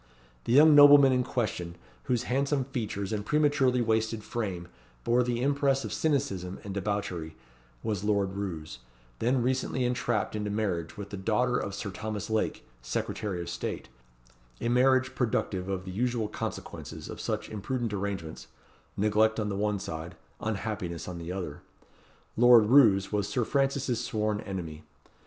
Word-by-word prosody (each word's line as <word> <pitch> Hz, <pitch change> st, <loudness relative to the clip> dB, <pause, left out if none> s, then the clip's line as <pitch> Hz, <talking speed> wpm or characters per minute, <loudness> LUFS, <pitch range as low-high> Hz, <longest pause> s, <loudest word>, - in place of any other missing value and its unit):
The 115 Hz, -, +1 dB
young 150 Hz, +3 st, +8 dB
nobleman 145 Hz, -2 st, +9 dB
in 125 Hz, -1 st, +2 dB
question, 100 Hz, -9 st, -3 dB, 0.3 s
whose 125 Hz, -1 st, 0 dB
handsome 140 Hz, +2 st, 0 dB
features 110 Hz, -6 st, -4 dB
and 105 Hz, -1 st, -2 dB
prematurely 140 Hz, -2 st, +2 dB
wasted 110 Hz, -1 st, 0 dB
frame 95 Hz, -8 st, -4 dB, 0.4 s
bore 120 Hz, +1 st, +3 dB
the 120 Hz, 0 st, -1 dB
impress 140 Hz, -2 st, +1 dB
of 110 Hz, -, -4 dB
cynicism 100 Hz, -, -1 dB
and 100 Hz, -, -6 dB
debauchery, 95 Hz, -5 st, -3 dB, 0.5 s
was 105 Hz, -3 st, -2 dB
Lord 100 Hz, -2 st, +1 dB
Roos, 80 Hz, -10 st, -5 dB, 0.4 s
then 125 Hz, +1 st, +1 dB
recently 130 Hz, 0 st, 0 dB
entrapped 120 Hz, -5 st, -1 dB
into 105 Hz, -1 st, -2 dB
marriage 100 Hz, -4 st, -2 dB
with 100 Hz, 0 st, -7 dB
the 100 Hz, -, -5 dB
daughter 115 Hz, +5 st, +1 dB
of 100 Hz, -4 st, -2 dB
Sir 100 Hz, -, -5 dB
Thomas 105 Hz, +2 st, -5 dB
Lake, 110 Hz, -, -1 dB, 0.2 s
Secretary 90 Hz, +9 st, -3 dB
of 85 Hz, -, -6 dB
State: -, -, -5 dB, 0.7 s
a 120 Hz, -, -1 dB
marriage 130 Hz, +1 st, +3 dB
productive 100 Hz, -6 st, -1 dB
of 95 Hz, -1 st, -3 dB
the 95 Hz, -, -6 dB
usual 120 Hz, +2 st, -1 dB
consequences 105 Hz, -, -6 dB
of -, -, -7 dB
such -, -, -2 dB
imprudent 115 Hz, +2 st, -3 dB
arrangements 95 Hz, -5 st, -4 dB, 0.5 s
neglect 110 Hz, +2 st, +2 dB
on 105 Hz, -1 st, -1 dB
the 100 Hz, -, -2 dB
one 105 Hz, +1 st, 0 dB
side, 80 Hz, -2 st, -6 dB, 0.2 s
unhappiness 100 Hz, -5 st, -3 dB
on 90 Hz, -2 st, -6 dB
the 85 Hz, +1 st, -6 dB
other. 90 Hz, -6 st, -5 dB, 0.7 s
Lord 120 Hz, -2 st, +7 dB
Roos 105 Hz, -9 st, +6 dB
was 105 Hz, -1 st, 0 dB
Sir 125 Hz, -4 st, 0 dB
Francis's 135 Hz, -3 st, 0 dB
sworn 105 Hz, -3 st, -1 dB
enemy. 85 Hz, -6 st, -6 dB
110 Hz, 150 wpm, -29 LUFS, 95-125 Hz, 0.7 s, nobleman